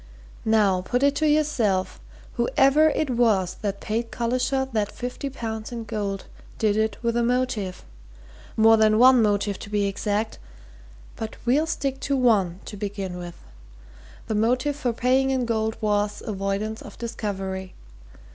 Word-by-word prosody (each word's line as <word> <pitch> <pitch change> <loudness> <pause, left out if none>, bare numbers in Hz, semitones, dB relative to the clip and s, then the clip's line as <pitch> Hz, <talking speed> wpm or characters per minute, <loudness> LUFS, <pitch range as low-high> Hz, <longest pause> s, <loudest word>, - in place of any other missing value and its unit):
Now, 205 -4 +3
put 245 +8 -1
it 280 0 +4
to 310 -1 +2
yourself 245 -11 +1 0.3
whoever 275 +5 +4
it 305 -2 -1
was 215 -7 +2
that 200 -1 -2
paid 230 +2 -2
Collishaw 255 +3 0
that 210 -2 0
fifty 250 +3 -5
pounds 220 -4 -5
in 235 -1 -5
gold 205 -3 -4 0.3
did 215 -2 +2
it 220 0 0
with 235 0 0
a 240 - +2
motive. 235 -6 -1 0.7
More 225 0 +6
than 215 0 +4
one 255 +1 +7
motive, 205 -2 +1
to 205 - -9
be 205 -1 +1
exact 205 +2 -2 0.8
but 220 -1 -6
we'll 285 +7 +3
stick 275 -5 -2
to 275 0 -1
one, 200 -8 +2
to - - -7
begin 195 -3 -4
with. 175 -1 -7 0.9
The 220 - -3
motive 250 +6 +1
for 260 -4 -1
paying 255 +3 +2
in 260 -2 0
gold 220 -1 -1
was 210 -1 0
avoidance 200 +1 -2
of - - -11
discovery. 195 -5 -4
220 Hz, 150 wpm, -24 LUFS, 205-250 Hz, 0.9 s, one